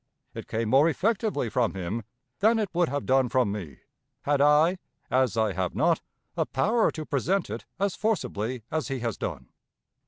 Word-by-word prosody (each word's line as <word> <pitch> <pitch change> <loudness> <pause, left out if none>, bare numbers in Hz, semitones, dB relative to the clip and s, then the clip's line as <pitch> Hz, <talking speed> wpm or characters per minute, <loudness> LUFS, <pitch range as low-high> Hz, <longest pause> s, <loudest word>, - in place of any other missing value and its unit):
It - - -8
came 110 0 -2
more 140 +6 +5
effectively 200 - 0
from 115 -1 0
him 95 +5 -3 0.4
than 220 +3 +4
it 215 -3 0
would 175 -1 +2
have 145 +1 -3
done 130 -1 +3
from 125 -4 +2
me, 90 -10 -7 0.4
had 145 -1 +2
I 155 +5 +4 0.3
(as 130 -3 +2
I 110 -3 +2
have 90 -1 -2
not) - - +2 0.3
a - - 0
power 225 +2 +2
to 155 -1 -6
present 170 - 0
it 115 - -6
as 200 -1 0
forcibly 125 - -2
as 160 0 -1
he 135 -3 -3
has 115 -3 -2
done. - - -5
135 Hz, 180 wpm, -27 LUFS, 115-175 Hz, 0.4 s, more